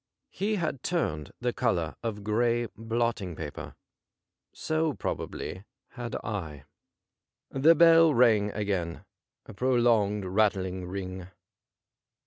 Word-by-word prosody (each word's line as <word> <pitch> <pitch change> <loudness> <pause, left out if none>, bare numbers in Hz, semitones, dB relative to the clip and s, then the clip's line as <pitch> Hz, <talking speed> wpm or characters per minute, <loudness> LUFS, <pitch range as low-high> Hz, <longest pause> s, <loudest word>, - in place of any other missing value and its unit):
He 215 +2 -1
had 160 -8 -2
turned 75 - -2
the 120 -1 0
colour 85 -10 0
of 105 -3 -4
gray 120 +3 +1
blotting 115 -5 -2
paper; 75 -2 -7 0.8
so 160 -1 -1
probably 95 -5 -5 0.3
had 120 -2 -6
I. 80 -10 -5 0.9
The 150 +5 +5
bell 165 0 +7
rang 115 -5 +4
again 95 -4 -2 0.2
— - - -62
a - - -11
prolonged, 115 -4 +2
rattling 95 -2 0
ring. 95 -1 -6
110 Hz, 110 wpm, -28 LUFS, 95-125 Hz, 0.9 s, bell